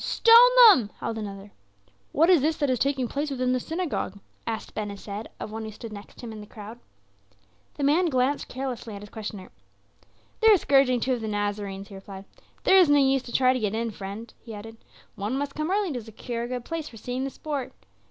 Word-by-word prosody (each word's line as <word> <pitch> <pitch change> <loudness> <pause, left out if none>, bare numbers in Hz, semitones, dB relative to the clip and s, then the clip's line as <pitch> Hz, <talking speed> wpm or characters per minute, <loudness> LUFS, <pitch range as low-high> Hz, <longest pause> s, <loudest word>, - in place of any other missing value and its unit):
"Stone 460 - +4 0.3
them!" 255 - +6
howled 225 - -4
another. 200 -1 -7 0.6
"What 325 +3 +4
is 345 -6 +6
this 310 +2 +1
that 285 -3 +1
is 250 - 0
taking 270 -2 0
place 290 +5 -2
within 255 -2 0
the 255 - +1
synagogue?" 320 - -3 0.3
asked 225 -1 -4
Ben 215 -1 -3
Hesed 200 +1 -7
of - - -6
one 220 +1 -5
who 220 - -5
stood 215 +1 -9
next 205 0 -11
him 235 -2 -7
in 215 -1 -8
the 210 - -11
crowd. 220 +2 -10 1.0
The 285 - -4
man 315 +6 +3
glanced 265 -1 0
carelessly 250 -4 -5
at 200 - -9
his 210 - -11
questioner. 210 -4 -7 0.9
"They 445 - +4
are 430 -2 +8
scourging 270 -6 +3
two 260 - +1
of 245 - -3
the 220 - -4
Nazarenes," 205 -1 -3
he - - -12
replied. 195 0 -10 0.4
"There 385 - +6
is 355 -5 +5
no 290 - +6
use 270 -1 +3
to 245 - -10
try 255 0 +4
to 255 - -1
get 215 -2 -1
in, 230 0 -2
friend," 205 +3 -8
he 225 -2 -9
added. 225 +2 -10 0.4
"One 210 +6 -3
must 280 0 -3
come 305 +2 -3
early 390 -4 0
to 245 - -4
secure 230 +2 -6
a 235 - -3
good 250 -1 -5
place 325 -2 -4
for 225 - -13
seeing 250 +4 -4
the 275 - -2
sport. 285 -2 -5
240 Hz, 220 wpm, -26 LUFS, 210-280 Hz, 1.0 s, are